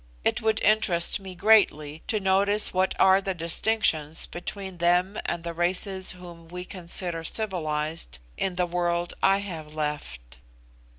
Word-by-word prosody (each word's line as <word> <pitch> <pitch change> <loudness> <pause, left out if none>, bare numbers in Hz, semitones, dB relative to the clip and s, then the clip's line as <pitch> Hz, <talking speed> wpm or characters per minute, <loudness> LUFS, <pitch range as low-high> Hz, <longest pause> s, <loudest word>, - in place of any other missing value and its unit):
It - - +1
would 220 0 +1
interest 200 -6 +2
me 190 -2 -9
greatly 160 -7 +3
to 215 - 0
notice 200 +2 +2
what 185 +1 +1
are 190 +1 +5
the 190 -1 -3
distinctions 165 -2 0
between 190 +1 -7
them 180 +3 +2
and 170 -1 -3
the 170 0 -5
races 185 +3 +2
whom 175 -2 -12
we 180 +2 -7
consider 175 -2 0
civilised 155 - -2 0.2
in 190 -2 -2
the 180 0 +1
world 175 0 -1
I 195 +1 +3
have 155 -5 -7
left." 65 - -5
175 Hz, 140 wpm, -26 LUFS, 165-195 Hz, 0.2 s, are